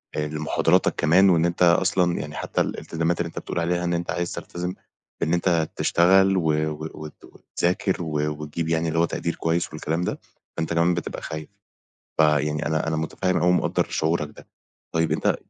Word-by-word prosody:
آآ 75 Hz, 0 st, -1 dB
لمحاضراتك 75 Hz, 0 st, +1 dB
كمان 95 Hz, +5 st, +5 dB
وإن 85 Hz, -2 st, +4 dB
أنت 85 Hz, +1 st, +1 dB
أصلًا 90 Hz, 0 st, +3 dB
يعني 75 Hz, 0 st, -6 dB
حتّي -, -, -1 dB
الإلتزامات 85 Hz, +1 st, -2 dB
اللي 85 Hz, -, 0 dB
أنت 80 Hz, -, -6 dB
بتقول -, -, -4 dB
عليها 85 Hz, +1 st, 0 dB
إن 85 Hz, 0 st, 0 dB
أنت 85 Hz, 0 st, -2 dB
عايز 85 Hz, 0 st, -2 dB
تلتزم 90 Hz, +1 st, -5 dB, 0.5 s
بإن 80 Hz, -, +1 dB
أنت 85 Hz, -2 st, +1 dB
تشتغل 95 Hz, +2 st, +4 dB
و 85 Hz, -, 0 dB, 0.3 s
و 80 Hz, +1 st, -6 dB
وت 75 Hz, 0 st, -10 dB
وتذاكر 90 Hz, +1 st, -2 dB
و 75 Hz, -2 st, -1 dB
وتجيب 80 Hz, +2 st, -3 dB
يعني 80 Hz, 0 st, +1 dB
اللي 80 Hz, +1 st, 0 dB
هو 85 Hz, -, +4 dB
تقدير 85 Hz, 0 st, -3 dB
كويس 85 Hz, +1 st, 0 dB
والكلام 80 Hz, +2 st, -2 dB
ده، 90 Hz, -, -2 dB, 0.4 s
فأنت 80 Hz, +1 st, -1 dB
كمان 85 Hz, +1 st, +3 dB
بتبقى 85 Hz, -, -4 dB
خايف. 80 Hz, -1 st, -6 dB, 0.7 s
فيعني 75 Hz, -1 st, +2 dB
أنا 80 Hz, 0 st, 0 dB
أنا 80 Hz, -, 0 dB
مُتفهِّم 90 Hz, +4 st, -1 dB
أوي 90 Hz, +2 st, +2 dB
ومقدَّر 90 Hz, -, +2 dB
شعورك 80 Hz, -1 st, 0 dB
ده. -, -, -14 dB, 0.5 s
طيب 80 Hz, 0 st, +1 dB
أنت -, -, +1 dB
85 Hz, 180 wpm, -24 LUFS, 80-85 Hz, 0.7 s, كمان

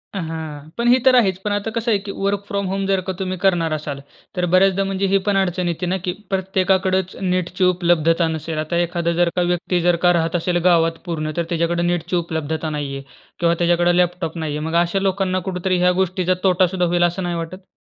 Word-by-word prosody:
हां. 160 Hz, -4 st, -6 dB
पण 235 Hz, 0 st, 0 dB
हे 250 Hz, +1 st, +6 dB
तर 260 Hz, -1 st, +6 dB
आहेच. 195 Hz, -7 st, +3 dB
पण 205 Hz, +1 st, -3 dB
आता 205 Hz, +2 st, -1 dB
कसं 230 Hz, 0 st, 0 dB
आहे 205 Hz, -, +4 dB
की 200 Hz, 0 st, -7 dB
वर्क 200 Hz, 0 st, -1 dB
फ्रॉम 200 Hz, -1 st, -2 dB
होम 195 Hz, +1 st, -2 dB
जर 195 Hz, -1 st, +2 dB
का 190 Hz, -, -1 dB
तुम्ही 185 Hz, -1 st, -3 dB
करणार 175 Hz, -4 st, +1 dB
असाल, 145 Hz, -2 st, -4 dB, 0.4 s
तर 180 Hz, 0 st, 0 dB
बऱ्याचदा 195 Hz, +1 st, +4 dB
म्हणजे 195 Hz, 0 st, -1 dB
हे 195 Hz, +1 st, +3 dB
पण 200 Hz, -1 st, +2 dB
अडचण 180 Hz, -1 st, 0 dB
येते 170 Hz, +1 st, -2 dB
ना 185 Hz, +2 st, 0 dB
की 180 Hz, -, -1 dB, 0.2 s
प्रत्येकाकडचं 190 Hz, 0 st, 0 dB
नेटची 180 Hz, +1 st, -1 dB
उपलब्धता 170 Hz, -2 st, +2 dB
नसेल. 160 Hz, 0 st, -4 dB
आता 155 Hz, +2 st, -2 dB
एखादा 170 Hz, 0 st, -1 dB
जर 175 Hz, 0 st, +2 dB
का 180 Hz, -, +1 dB
व्यक्ती, 175 Hz, 0 st, 0 dB
जर 175 Hz, 0 st, +3 dB
का 175 Hz, -, +6 dB
राहत 165 Hz, 0 st, 0 dB
असेल 175 Hz, +1 st, 0 dB
गावात 165 Hz, -2 st, +3 dB
पूर्ण, 155 Hz, -3 st, -3 dB
तर 170 Hz, -, +1 dB
त्याच्याकडे 170 Hz, 0 st, 0 dB
नेटची 175 Hz, 0 st, -1 dB
उपलब्धता 160 Hz, -2 st, -2 dB
नाहीये 140 Hz, -2 st, -4 dB, 0.4 s
किंवा 170 Hz, -1 st, +3 dB
त्याच्याकडे 175 Hz, +1 st, +2 dB
लॅपटॉप 175 Hz, -2 st, 0 dB
नाहीये. 150 Hz, -2 st, -3 dB
मग 160 Hz, +2 st, -3 dB
अशा 175 Hz, +3 st, -1 dB
लोकांना 190 Hz, -1 st, 0 dB
कुठेतरी 185 Hz, 0 st, -1 dB
ह्या 180 Hz, 0 st, +4 dB
गोष्टीचा 185 Hz, 0 st, 0 dB
तोटा 185 Hz, -1 st, +4 dB
सुद्धा 180 Hz, 0 st, -1 dB
होईल, 175 Hz, 0 st, +1 dB
असं 175 Hz, +2 st, 0 dB
नाही 175 Hz, -1 st, -2 dB
वाटत? 175 Hz, +3 st, -6 dB
175 Hz, 210 wpm, -20 LUFS, 165-190 Hz, 0.4 s, हे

